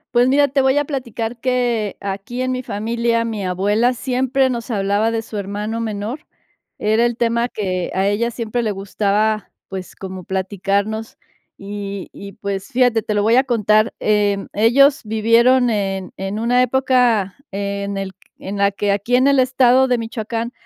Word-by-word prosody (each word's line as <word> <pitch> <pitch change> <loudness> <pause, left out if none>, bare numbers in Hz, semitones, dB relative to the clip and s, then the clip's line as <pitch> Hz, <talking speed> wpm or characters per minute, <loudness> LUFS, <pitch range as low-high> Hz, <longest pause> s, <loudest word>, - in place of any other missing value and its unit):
Pues, 245 +1 +5
mira, 280 +1 +4
te 275 - +1
voy 265 +1 +3
a 290 - +3
platicar 245 -5 -4
que, 240 -4 0
aquí 200 +5 -4
en 255 0 0
mi 255 0 -3
familia, 230 +2 -1
mi 220 -4 -3
abuela 205 +7 +1
siempre 260 +1 0
nos 235 -2 -4
hablaba 205 0 +1
de 225 0 -1
su 220 -1 -8
hermano 205 +3 -3
menor. 225 +5 -4 0.5
Era 220 +3 +2
el 240 - 0
tema 235 0 +1
que 185 -6 -3
a 190 +1 +1
ella 210 +4 +1
siempre 235 0 -3
le 220 -2 -1
gustaba, 205 +1 0 0.2
pues, 190 -1 -7
como 190 -2 -8
platicarnos, 200 +3 -2 0.4
y 200 -1 -6
y, 200 0 -10
pues, 200 -1 -4
fíjate, 245 -4 +2
te 210 - -2
lo 205 - +1
voy 225 +3 +4
a 265 - +4
contar. 215 -2 +2
Em, 205 -2 +1
ellos 260 +7 +4
vivieron 230 +4 +4
en 195 -3 -2
en 195 +2 -4
una 245 +2 +3
época 250 -6 +2
en 200 0 -3
el 195 -1 -4
q 190 - -60 0.2
en 200 +2 -5
la 200 0 +3
que, 200 +1 -1
aquí 205 +5 +1
en 255 +2 +4
el 280 -1 +4
estado 255 0 +4
de 250 -1 +2
Michoacán 230 0 -4
220 Hz, 175 wpm, -19 LUFS, 200-245 Hz, 0.5 s, Pues